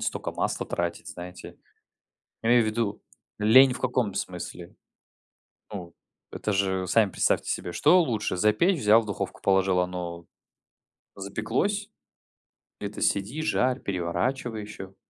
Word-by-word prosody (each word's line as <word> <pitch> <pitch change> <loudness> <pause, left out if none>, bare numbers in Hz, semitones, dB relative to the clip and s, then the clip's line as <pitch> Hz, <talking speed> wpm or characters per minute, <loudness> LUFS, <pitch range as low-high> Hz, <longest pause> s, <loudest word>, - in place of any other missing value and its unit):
столько - - -3
масла - - -2
тратить, 85 0 -3
знаете. 90 0 -9 0.9
Имею 120 +1 +4
ввиду 110 -1 -2 0.4
лень 125 +5 +6
в - - -7
каком 125 -5 0
смысле, 90 -1 -6 1.0
ну, 90 -5 -7 0.4
это 105 - -2
же 95 -1 0
сами 105 +2 +3
представьте - - +1
себе, 90 - -3
что 180 - +5
лучше 110 - -1
запечь- 110 - +3
взял 110 +2 +5
в 110 - -10
духовку 100 -2 -4
положил 95 -1 +3
оно 90 -1 -4 0.9
запеклось, 115 - -2 0.9
это 105 0 -6
сиди 105 +10 0
жарь 130 -4 +1
переворачивай 110 +6 -2
еще. 95 -2 -9
105 Hz, 120 wpm, -26 LUFS, 95-120 Hz, 1.0 s, лень